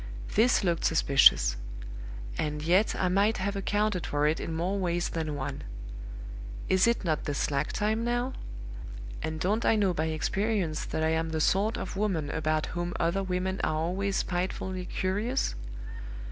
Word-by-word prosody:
This 230 Hz, +1 st, +4 dB
looked 170 Hz, -3 st, +1 dB
suspicious; 135 Hz, -, +5 dB, 0.8 s
and 150 Hz, -1 st, -2 dB
yet 185 Hz, +6 st, +3 dB
I 185 Hz, -, +1 dB
might 200 Hz, +4 st, +3 dB
have 200 Hz, +1 st, -1 dB
accounted 205 Hz, -1 st, 0 dB
for 145 Hz, 0 st, +1 dB
it 155 Hz, +2 st, +2 dB
in -, -, -4 dB
more 175 Hz, +5 st, 0 dB
ways 175 Hz, -2 st, 0 dB
than 155 Hz, -3 st, -2 dB
one. 135 Hz, -2 st, -4 dB, 1.1 s
Is 190 Hz, +3 st, +4 dB
it 235 Hz, -4 st, +1 dB
not 155 Hz, -2 st, 0 dB
the 145 Hz, -, -1 dB
slack 140 Hz, +1 st, 0 dB
time 220 Hz, +2 st, 0 dB
now? 240 Hz, +2 st, 0 dB, 0.9 s
and 160 Hz, 0 st, -3 dB
don't 210 Hz, +7 st, +1 dB
I -, -, +4 dB
know 200 Hz, -4 st, +3 dB
by 155 Hz, -1 st, 0 dB
experience 170 Hz, +1 st, 0 dB
that 160 Hz, -, -2 dB
I 160 Hz, -, +3 dB
am 160 Hz, 0 st, +1 dB
the 160 Hz, 0 st, -1 dB
sort 200 Hz, +8 st, +2 dB
of -, -, -5 dB
woman 175 Hz, -8 st, 0 dB
about 155 Hz, -1 st, 0 dB
whom 175 Hz, 0 st, -2 dB
other 170 Hz, +4 st, +2 dB
women 190 Hz, 0 st, -1 dB
are 155 Hz, -, +1 dB
always 185 Hz, +5 st, 0 dB
spitefully 185 Hz, +1 st, -2 dB
curious? 210 Hz, +8 st, 0 dB
180 Hz, 160 wpm, -29 LUFS, 160-200 Hz, 1.1 s, suspicious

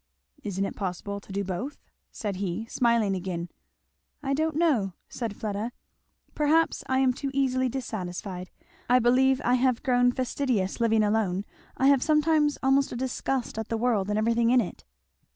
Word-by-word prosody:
"Isn't 195 Hz, -2 st, -2 dB
it -, -, -5 dB
possible 200 Hz, +1 st, -4 dB
to 200 Hz, -, -14 dB
do 200 Hz, +1 st, -1 dB
both?" 200 Hz, +10 st, -4 dB, 0.3 s
said 205 Hz, -4 st, -4 dB
he, 195 Hz, +2 st, -3 dB
smiling 230 Hz, -4 st, +2 dB
again. 175 Hz, -2 st, -4 dB, 0.7 s
"I 275 Hz, 0 st, 0 dB
don't 315 Hz, +2 st, 0 dB
know," 270 Hz, -, +2 dB
said 230 Hz, -4 st, -5 dB
Fleda, 215 Hz, +2 st, -3 dB, 0.6 s
"perhaps 310 Hz, +2 st, +2 dB
I 260 Hz, -, +2 dB
am 260 Hz, -1 st, +3 dB
too 275 Hz, +2 st, -4 dB
easily 260 Hz, -2 st, +1 dB
dissatisfied 185 Hz, -7 st, -5 dB, 0.4 s
I 250 Hz, -, +6 dB
believe 255 Hz, +2 st, +4 dB
I 245 Hz, -, +3 dB
have 255 Hz, -1 st, +2 dB
grown 245 Hz, -1 st, +3 dB
fastidious 245 Hz, -5 st, -1 dB
living 225 Hz, -2 st, +3 dB
alone 205 Hz, -2 st, 0 dB, 0.3 s
I 265 Hz, -, +1 dB
have 275 Hz, -2 st, +5 dB
sometimes 300 Hz, -1 st, +3 dB
almost 270 Hz, +1 st, +3 dB
a -, -, -4 dB
disgust 255 Hz, -1 st, -2 dB
at 220 Hz, -, -4 dB
the 230 Hz, -, 0 dB
world 220 Hz, -4 st, +1 dB
and 210 Hz, -, 0 dB
everything 230 Hz, +1 st, +2 dB
in 250 Hz, +1 st, +5 dB
it." 210 Hz, -, -4 dB
235 Hz, 165 wpm, -27 LUFS, 200-265 Hz, 0.7 s, I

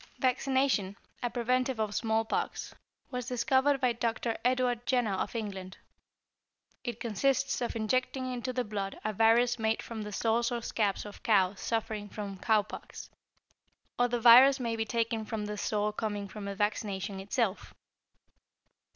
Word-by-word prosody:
= -, -, -30 dB
Vaccination, 260 Hz, -6 st, +1 dB, 0.3 s
a 245 Hz, -, 0 dB
preventive 250 Hz, +1 st, 0 dB
of 215 Hz, -1 st, -1 dB
smallpox, 220 Hz, +1 st, -1 dB, 0.4 s
was 250 Hz, -2 st, -4 dB
discovered 265 Hz, +3 st, +2 dB
by 250 Hz, -2 st, +2 dB
Dr. 230 Hz, 0 st, -1 dB
Edward 250 Hz, -1 st, +1 dB
Jenner 245 Hz, -6 st, +2 dB
of 190 Hz, -, -3 dB
England. 195 Hz, -4 st, -5 dB, 1.1 s
It 240 Hz, -2 st, -4 dB
consists 255 Hz, +5 st, 0 dB
of 240 Hz, -, -2 dB
injecting 255 Hz, +4 st, 0 dB
into 250 Hz, +1 st, -3 dB
the 250 Hz, 0 st, -1 dB
blood 200 Hz, -2 st, -4 dB
a 215 Hz, -, 0 dB
virus 230 Hz, +3 st, +4 dB
made 220 Hz, 0 st, 0 dB
from 225 Hz, -2 st, -6 dB
the 210 Hz, 0 st, -6 dB
sores 230 Hz, +3 st, +1 dB
or 235 Hz, -1 st, -3 dB
scabs 210 Hz, -4 st, -1 dB
of 205 Hz, -, -10 dB
cows 195 Hz, -3 st, +2 dB
suffering 220 Hz, -2 st, -2 dB
from 200 Hz, -2 st, -6 dB
cowpox, 215 Hz, +1 st, -1 dB, 0.9 s
or 245 Hz, -, +4 dB
the 240 Hz, 0 st, -1 dB
virus 255 Hz, +4 st, +8 dB
may 230 Hz, -2 st, -1 dB
be 225 Hz, 0 st, -1 dB
taken 230 Hz, -1 st, -1 dB
from 215 Hz, -1 st, -4 dB
the 210 Hz, 0 st, -4 dB
sore 210 Hz, 0 st, -1 dB
coming 205 Hz, -2 st, -3 dB
from 200 Hz, 0 st, -6 dB
vaccination 200 Hz, -1 st, -2 dB
itself. 200 Hz, +1 st, -2 dB
225 Hz, 150 wpm, -30 LUFS, 210-245 Hz, 1.1 s, virus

